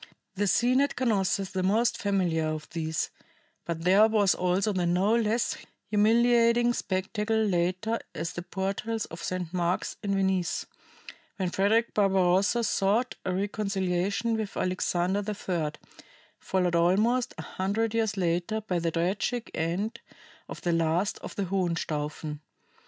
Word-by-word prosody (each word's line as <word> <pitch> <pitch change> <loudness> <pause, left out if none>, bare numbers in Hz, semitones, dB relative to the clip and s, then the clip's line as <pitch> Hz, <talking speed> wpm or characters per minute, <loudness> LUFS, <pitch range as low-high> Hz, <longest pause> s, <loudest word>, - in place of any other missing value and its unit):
The 205 +1 0
scene 245 +7 +3
at 285 - 0
Canossa 205 -6 +1
is 190 - -8
the 190 - -1
most 225 +6 +2
familiar 180 -6 0
of 155 -1 -4
these, 160 -1 -2 0.5
but 165 -1 -4
there 195 +5 +6
was 210 -4 +3
also 185 +4 +1
the 180 -2 0
no 190 +6 +3
less 230 0 +1 0.4
humiliating 235 +2 +4
spectacle 210 +3 -1
later 185 +2 0 0.2
at - - -3
the 175 - -6
portals 195 +5 -3
of 165 - -9
St. 180 -2 -4
Mark's 175 0 -1
in 200 -2 -1
Venice, 190 -3 0 0.7
when 185 -3 -1
Frederick 220 +5 +2
Barbarossa 195 +3 +3
sought 215 +4 +1
a 185 - 0
reconciliation 200 +2 -1
with 215 -2 -4
Alexander 185 +1 0
III, 185 -7 -2 0.7
followed 180 -2 0
almost 210 +9 +2
a 160 - -6
hundred 210 +6 -1
years 220 -3 0
later 175 +4 0
by 190 -5 -2
the 165 0 0
tragic 190 +8 -1
end 175 +7 -2 0.5
of - - -7
the 175 - 0
last 165 +4 +1
of - - -8
the 200 - -1
Hohenstaufen. 160 -5 -2
195 Hz, 140 wpm, -28 LUFS, 175-215 Hz, 0.7 s, there